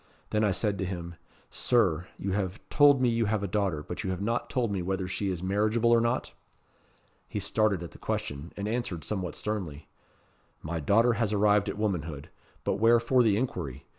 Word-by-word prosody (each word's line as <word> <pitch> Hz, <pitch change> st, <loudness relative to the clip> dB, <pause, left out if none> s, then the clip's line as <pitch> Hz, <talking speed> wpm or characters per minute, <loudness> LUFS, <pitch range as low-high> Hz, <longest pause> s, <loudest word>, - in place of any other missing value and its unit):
Then 105 Hz, 0 st, +2 dB
I 105 Hz, -, +3 dB
said 100 Hz, +1 st, 0 dB
to -, -, 0 dB
him 85 Hz, -2 st, -5 dB, 0.4 s
'Sir, 90 Hz, -8 st, +2 dB
you 95 Hz, -, -3 dB
have 95 Hz, 0 st, -2 dB
told 145 Hz, -2 st, +6 dB
me 125 Hz, -, +3 dB
you 115 Hz, -1 st, +1 dB
have 105 Hz, -1 st, 0 dB
a -, -, -1 dB
daughter, 95 Hz, -6 st, -1 dB
but 90 Hz, -, -5 dB
you 95 Hz, -, -2 dB
have 95 Hz, -1 st, -2 dB
not 115 Hz, +4 st, -1 dB
told 120 Hz, -4 st, 0 dB
me 95 Hz, -2 st, -1 dB
whether 95 Hz, +1 st, -2 dB
she 100 Hz, +2 st, -2 dB
is 90 Hz, -2 st, -3 dB
marriageable 110 Hz, +5 st, +2 dB
or 115 Hz, -1 st, +5 dB
not?' 120 Hz, +2 st, -1 dB, 1.0 s
He 105 Hz, -, -3 dB
started 100 Hz, -2 st, +1 dB
at 85 Hz, -, -8 dB
the -, -, -15 dB
question, 70 Hz, +3 st, -4 dB
and 100 Hz, +1 st, -3 dB
answered 110 Hz, -8 st, -2 dB
somewhat 90 Hz, -4 st, -3 dB
sternly. 90 Hz, -9 st, -4 dB, 0.8 s
'My 80 Hz, +1 st, -3 dB
daughter 115 Hz, -, +4 dB
has 110 Hz, -3 st, +1 dB
arrived 105 Hz, -1 st, +3 dB
at -, -, -4 dB
womanhood. 85 Hz, -9 st, -2 dB, 0.3 s
But -, -, 0 dB
wherefore 115 Hz, +3 st, +4 dB
the 110 Hz, -4 st, +3 dB
inquiry? 80 Hz, -, -3 dB
100 Hz, 195 wpm, -28 LUFS, 90-115 Hz, 1.0 s, told